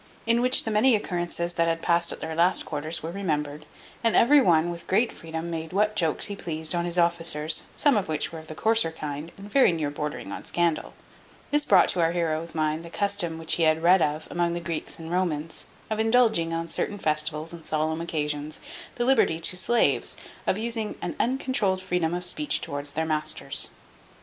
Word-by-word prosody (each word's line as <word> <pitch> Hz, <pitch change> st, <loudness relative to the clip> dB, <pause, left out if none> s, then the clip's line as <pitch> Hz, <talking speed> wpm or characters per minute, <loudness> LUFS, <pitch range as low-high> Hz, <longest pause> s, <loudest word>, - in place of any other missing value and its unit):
In 230 Hz, +1 st, +3 dB
which 255 Hz, +1 st, +4 dB
the 220 Hz, -, -3 dB
many 225 Hz, +4 st, +4 dB
occurrences 175 Hz, -3 st, -3 dB
that 170 Hz, -1 st, +1 dB
had 165 Hz, 0 st, -1 dB
passed 170 Hz, 0 st, +2 dB
at -, -, -7 dB
their 160 Hz, -, -4 dB
last 170 Hz, +3 st, +3 dB
quarters 155 Hz, +2 st, -3 dB
were 165 Hz, -, -4 dB
remembered, 150 Hz, -5 st, -3 dB, 0.4 s
and 230 Hz, -, +3 dB
every 280 Hz, +5 st, +6 dB
one, 170 Hz, -4 st, +3 dB
with 170 Hz, 0 st, -8 dB
great 225 Hz, +5 st, +2 dB
freedom, 165 Hz, +1 st, -6 dB
made 160 Hz, +1 st, -5 dB
what 210 Hz, +2 st, +2 dB
jokes 165 Hz, -7 st, +1 dB
he 200 Hz, -, -5 dB
pleased 160 Hz, -3 st, -2 dB
on 170 Hz, 0 st, 0 dB
his 175 Hz, 0 st, -2 dB
officers, 165 Hz, -3 st, +1 dB
some 290 Hz, -4 st, +4 dB
of 200 Hz, -5 st, -1 dB
which 155 Hz, -1 st, -1 dB
were 165 Hz, -, -7 dB
of 160 Hz, -, -13 dB
the 155 Hz, -, -7 dB
coarser 220 Hz, -2 st, +1 dB
kind, 150 Hz, 0 st, -6 dB
and 200 Hz, +1 st, -11 dB
very 265 Hz, -4 st, +5 dB
near 155 Hz, -4 st, -2 dB
bordering 150 Hz, 0 st, -5 dB
on -, -, -6 dB
scandal. 170 Hz, -2 st, -1 dB, 0.6 s
This 295 Hz, 0 st, +3 dB
brought 190 Hz, -3 st, +6 dB
to 180 Hz, -, 0 dB
our 165 Hz, 0 st, +2 dB
heroe's 165 Hz, -1 st, -2 dB
mind 155 Hz, +1 st, 0 dB
the 170 Hz, -, -9 dB
custom 200 Hz, -3 st, -1 dB
which 165 Hz, 0 st, 0 dB
he -, -, -1 dB
had 160 Hz, 0 st, +3 dB
read 180 Hz, +1 st, +6 dB
of 155 Hz, +1 st, -1 dB
among 175 Hz, -1 st, 0 dB
the 175 Hz, -, -2 dB
Greeks 170 Hz, -2 st, -4 dB
and 165 Hz, 0 st, -8 dB
Romans, 165 Hz, -4 st, -2 dB, 0.2 s
of 215 Hz, 0 st, -3 dB
indulging, 220 Hz, -7 st, +3 dB
on 165 Hz, 0 st, -2 dB
certain 205 Hz, +4 st, -2 dB
festivals 155 Hz, -1 st, -1 dB
and 170 Hz, -1 st, -10 dB
solemn 155 Hz, +1 st, -1 dB
occasions, 150 Hz, -2 st, -3 dB, 0.4 s
the 240 Hz, -, -1 dB
liberty 235 Hz, -11 st, +3 dB
to 175 Hz, -, +1 dB
slaves, 235 Hz, +6 st, +1 dB, 0.3 s
of 190 Hz, -, +2 dB
using 225 Hz, -1 st, -2 dB
an 175 Hz, -, -3 dB
uncontrouled 250 Hz, -6 st, +1 dB
freedom 175 Hz, -2 st, -1 dB
of 180 Hz, 0 st, -5 dB
speech 295 Hz, +11 st, 0 dB
towards 145 Hz, 0 st, -4 dB
their 160 Hz, +2 st, -1 dB
masters. 155 Hz, -3 st, 0 dB
170 Hz, 205 wpm, -26 LUFS, 160-200 Hz, 0.6 s, every